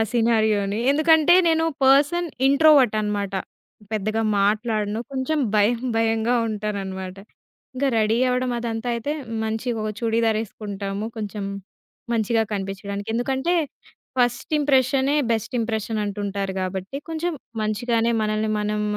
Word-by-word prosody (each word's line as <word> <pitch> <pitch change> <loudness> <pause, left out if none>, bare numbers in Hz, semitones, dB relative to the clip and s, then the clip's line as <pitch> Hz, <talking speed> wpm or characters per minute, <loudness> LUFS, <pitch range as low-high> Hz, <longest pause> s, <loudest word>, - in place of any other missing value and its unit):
సినారియోని, 220 -3 +2
ఎందుకంటే, 315 +3 +5
నేను 325 0 +2 0.2
person 290 +6 +4 0.2
introvert 280 -4 +5
అనమాట. 205 -2 -2 0.6
పెద్దగా 215 +1 -1 0.2
మాట్లాడను 215 +1 0
కొంచెం 270 +4 -1 0.2
భయం, 215 +3 +3 0.2
భయంగా 225 +1 +1
ఉంటాననమాట. 195 -3 -4 0.6
ఇంక 260 +2 -1
రెడీ 215 +1 +2
అవ్వడం 250 0 0
అదంతైతే 235 +3 -2 0.3
మంచిగా 225 +1 -2
ఓ - - -1
చుడీదార్ 225 -1 +1
ఎసుకుంటాము, 200 -1 -5
కొంచెం 210 -1 -4 0.7
మంచిగా 225 0 +2
కనిపించడానికి. 200 +1 -4
ఎందుకంటే, 265 +8 0 0.6
ఫస్ట్ 245 0 +1
ఇంప్రెషనే 275 0 +2 0.2
బెస్ట్ 225 +3 -3
ఇంప్రెషన్‌ 220 -1 -2
అంటుంటారు. 200 -1 -3
గాబట్టి 185 +5 -4
కొంచెం 330 +2 -2 0.3
మంచిగానే 230 +2 0
మనల్ని 215 0 0
మనం 210 0 -1
225 Hz, 110 wpm, -23 LUFS, 210-255 Hz, 0.7 s, ఎందుకంటే